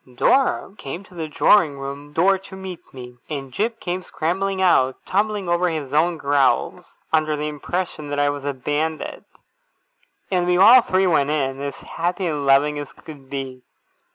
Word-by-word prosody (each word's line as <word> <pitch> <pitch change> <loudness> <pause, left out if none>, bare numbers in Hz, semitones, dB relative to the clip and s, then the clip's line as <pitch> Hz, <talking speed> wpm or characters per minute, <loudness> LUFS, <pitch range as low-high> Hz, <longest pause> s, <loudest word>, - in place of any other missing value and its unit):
Dora 265 - +2
came 155 +8 -6
to 185 - -19
the 165 -3 -4
drawing 155 -1 +3
room 140 +1 -7
door 190 +5 +3
to 190 0 -12
meet 190 -2 -7
me; 125 -1 -11
and 135 -3 -5
Jip 225 +2 -1
came 180 +1 -3
scrambling 190 +4 -2
out, 135 -8 +3
tumbling 205 -1 0
over 175 +1 +2
his 150 -4 -4
own 170 +3 +2
growls, 140 -2 0 0.2
under 155 -1 +2
the 150 +1 -2
impression 150 +1 -4
that 145 - -3
I 145 0 +3
was 145 -1 -4
a 145 - -1
Bandit; 150 +4 -3 1.1
and 180 -2 +1
we 180 0 +3
all 230 +7 +8
three 190 -3 +1
went 155 -5 +2
in, 135 -3 -1
as 140 -1 -5
happy 175 +3 -3
and 150 -4 -2
loving 145 +2 +4
as 145 - -7
could 140 -4 -13
be. 135 -2 -5
155 Hz, 175 wpm, -22 LUFS, 140-185 Hz, 1.1 s, all